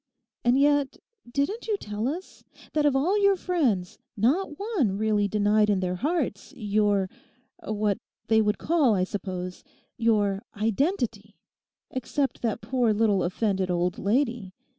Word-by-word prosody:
'And 245 Hz, +2 st, +4 dB
yet, 285 Hz, -1 st, +2 dB, 0.3 s
didn't 285 Hz, -, -1 dB
you 425 Hz, -2 st, +1 dB
tell 210 Hz, -, -3 dB
us, 345 Hz, +7 st, -6 dB, 0.3 s
that 300 Hz, -1 st, +3 dB
of 280 Hz, -, +2 dB
all 365 Hz, +10 st, +2 dB
your 400 Hz, -1 st, +5 dB
friends 265 Hz, -, 0 dB, 0.2 s
not 295 Hz, -, +1 dB
one 360 Hz, -, 0 dB
really 210 Hz, -1 st, +2 dB
denied 210 Hz, +1 st, +2 dB
in 200 Hz, -2 st, +2 dB
their 180 Hz, -1 st, -2 dB
hearts 295 Hz, -, -2 dB
your—what 210 Hz, +1 st, -1 dB, 0.3 s
they 220 Hz, 0 st, +4 dB
would 210 Hz, 0 st, +1 dB
call, 300 Hz, -10 st, +2 dB
I 185 Hz, -, +1 dB
suppose—your 195 Hz, +2 st, -2 dB, 0.2 s
identity; 220 Hz, -, -1 dB, 0.6 s
except 260 Hz, +2 st, -2 dB
that 225 Hz, -3 st, -1 dB
poor 235 Hz, 0 st, +1 dB
little 210 Hz, -3 st, +3 dB
offended 190 Hz, 0 st, 0 dB
old 175 Hz, 0 st, 0 dB
lady. 230 Hz, -3 st, 0 dB
220 Hz, 130 wpm, -26 LUFS, 200-280 Hz, 0.6 s, your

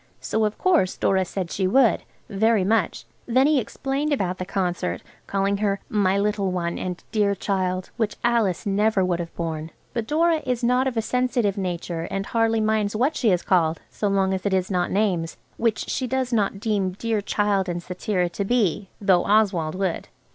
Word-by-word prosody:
So 220 Hz, 0 st, 0 dB
of 210 Hz, -, -2 dB
course 340 Hz, -, +2 dB
Dora 190 Hz, -1 st, +2 dB
said 180 Hz, -1 st, -4 dB
she 190 Hz, -1 st, 0 dB
would, 245 Hz, +3 st, +4 dB, 0.3 s
very 220 Hz, 0 st, +2 dB
much. 205 Hz, -2 st, 0 dB, 0.2 s
Then 255 Hz, +3 st, +4 dB
he 300 Hz, -1 st, +4 dB
explained 275 Hz, +5 st, -2 dB
about 185 Hz, -10 st, -1 dB
the 185 Hz, -, -4 dB
concert, 180 Hz, -2 st, -2 dB, 0.2 s
calling 200 Hz, 0 st, 0 dB
her 200 Hz, -1 st, 0 dB
"My 200 Hz, -2 st, +2 dB
little 200 Hz, -1 st, 0 dB
one," 170 Hz, -1 st, -2 dB
and 180 Hz, -1 st, -5 dB
"dear 205 Hz, -2 st, +2 dB
child," 185 Hz, -2 st, -2 dB
which 220 Hz, -3 st, -1 dB
Alice 230 Hz, -5 st, +1 dB
never 205 Hz, -1 st, +2 dB
would 175 Hz, -1 st, 0 dB
have 170 Hz, -1 st, -6 dB
borne, 160 Hz, -2 st, -4 dB, 0.2 s
but 230 Hz, -2 st, -2 dB
Dora 325 Hz, +1 st, +2 dB
is 250 Hz, -1 st, -2 dB
not 250 Hz, +2 st, +3 dB
of 250 Hz, -3 st, -3 dB
a 225 Hz, -, +1 dB
sensitive 245 Hz, -4 st, 0 dB
nature, 175 Hz, -3 st, -3 dB
and 195 Hz, 0 st, -3 dB
hardly 225 Hz, 0 st, +1 dB
minds 215 Hz, -1 st, +1 dB
what 260 Hz, +8 st, +1 dB
she 235 Hz, -, +2 dB
is 180 Hz, -3 st, +2 dB
called, 165 Hz, -3 st, +2 dB
so 210 Hz, -, -2 dB
long 195 Hz, -1 st, +2 dB
as 190 Hz, -, -3 dB
it 200 Hz, -2 st, +1 dB
is 185 Hz, +1 st, -1 dB
not 180 Hz, -1 st, +1 dB
names, 185 Hz, -6 st, 0 dB, 0.2 s
which 225 Hz, -2 st, 0 dB
she 255 Hz, -, -2 dB
does 260 Hz, 0 st, -1 dB
not 200 Hz, -3 st, +1 dB
deem 200 Hz, -4 st, 0 dB
"dear 220 Hz, +2 st, -1 dB
child" 200 Hz, -2 st, 0 dB
and 175 Hz, 0 st, -3 dB
cetera 180 Hz, 0 st, -1 dB
to 175 Hz, +4 st, -3 dB
be, 205 Hz, -3 st, 0 dB
though 190 Hz, -3 st, +3 dB
Oswald 195 Hz, -7 st, +2 dB
would. 190 Hz, -3 st, -2 dB
200 Hz, 190 wpm, -24 LUFS, 185-225 Hz, 0.3 s, would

